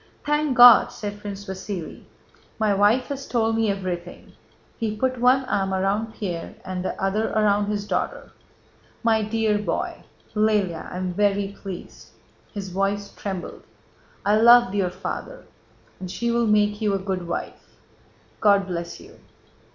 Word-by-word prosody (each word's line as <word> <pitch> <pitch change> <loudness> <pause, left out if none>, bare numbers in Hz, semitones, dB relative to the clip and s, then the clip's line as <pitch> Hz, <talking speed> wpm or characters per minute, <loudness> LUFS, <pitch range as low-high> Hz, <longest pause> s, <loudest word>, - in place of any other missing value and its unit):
"Thank 295 -2 +1
God!" 245 -1 +9
said 205 -1 -6
Prince 200 -1 -7
Vasíli. 190 -2 -6 0.6
"My 215 -2 +2
wife 205 +6 +3
has 275 -1 -5
told 225 -2 +1
me 225 -1 +1
everything!" 180 -3 -5 0.5
(He 220 -2 -2
put 255 +2 -1
one 255 +2 +4
arm 190 -4 0
around 205 +4 -1
Pierre 175 -5 -5
and 185 -1 -4
the - - -4
other 200 +3 0
around 205 -1 +2
his 205 -1 -2
daughter.)—"My 220 +1 -4
dear 215 -1 0
boy... 210 - -3 0.3
Lëlya... 210 -6 0
I - - -5
am 185 -1 -3
very 200 0 +1
pleased." 195 -2 -10 0.4
(His 200 -3 -6
voice 200 +2 -1
trembled.) 190 -3 -6 0.6
"I 205 +1 +4
loved 240 -1 +6
your 195 -3 +1
father... - - -6 0.5
and 185 - -6
she 235 +5 -2
will 235 -1 +1
make 210 0 +2
you 205 -2 +1
a - - +1
good 190 -2 -4
wife... 170 - -6 0.6
God 200 -2 +4
bless 170 -2 -5
you!..." 410 +4 -16
205 Hz, 145 wpm, -24 LUFS, 190-225 Hz, 0.6 s, God